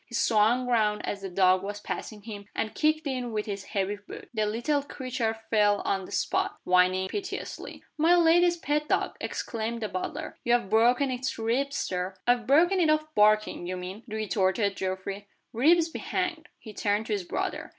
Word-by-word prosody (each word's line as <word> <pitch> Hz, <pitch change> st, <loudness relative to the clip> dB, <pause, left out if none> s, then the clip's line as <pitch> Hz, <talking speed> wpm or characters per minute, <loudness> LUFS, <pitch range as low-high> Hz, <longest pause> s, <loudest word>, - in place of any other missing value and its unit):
He 240 Hz, -, -7 dB
swung 230 Hz, +3 st, +3 dB
round 215 Hz, -4 st, +1 dB
as 200 Hz, -, -4 dB
the 195 Hz, -, -5 dB
dog 185 Hz, 0 st, +3 dB
was 205 Hz, +1 st, -5 dB
passing 210 Hz, 0 st, -6 dB
him, 205 Hz, -2 st, -8 dB
and 215 Hz, -, -2 dB
kicked 310 Hz, +1 st, +1 dB
it 260 Hz, -3 st, -2 dB
with 215 Hz, -2 st, -3 dB
his 200 Hz, -2 st, -5 dB
heavy 200 Hz, 0 st, -2 dB
boot. 205 Hz, -, -11 dB
The 215 Hz, -2 st, 0 dB
little 240 Hz, +7 st, 0 dB
creature 255 Hz, -5 st, -3 dB, 0.2 s
fell 205 Hz, -2 st, +3 dB
on 195 Hz, -1 st, 0 dB
the -, -, -12 dB
spot, 390 Hz, +1 st, -1 dB
whining 185 Hz, +1 st, +3 dB
piteously. 390 Hz, -, -6 dB, 0.2 s
"My 335 Hz, +3 st, +5 dB
lady's 345 Hz, +1 st, +4 dB
pet 300 Hz, -2 st, -1 dB
dog!" -, -, 0 dB
exclaimed 230 Hz, 0 st, -3 dB
the -, -, 0 dB
butler. 185 Hz, -, -5 dB
"You've 240 Hz, -4 st, +1 dB
broken 245 Hz, +5 st, +4 dB
its 255 Hz, +1 st, -3 dB
ribs, 250 Hz, +5 st, 0 dB
Sir." 185 Hz, +1 st, -2 dB
"I've 240 Hz, -2 st, +2 dB
broken 345 Hz, +8 st, +4 dB
it 330 Hz, -3 st, +3 dB
of 310 Hz, 0 st, +1 dB
barking, 215 Hz, -5 st, +3 dB
you 185 Hz, 0 st, -3 dB
mean," 185 Hz, +4 st, -7 dB
retorted 205 Hz, -2 st, 0 dB
Geoffrey. 190 Hz, +2 st, -4 dB, 0.3 s
"Ribs 320 Hz, +8 st, +4 dB
be 325 Hz, -, -7 dB
hanged!" 360 Hz, -4 st, -3 dB
He 215 Hz, -, -11 dB
turned 205 Hz, +2 st, 0 dB
to 220 Hz, -, -2 dB
his 200 Hz, -3 st, -1 dB
brother. -, -, -3 dB
220 Hz, 180 wpm, -27 LUFS, 200-280 Hz, 0.3 s, My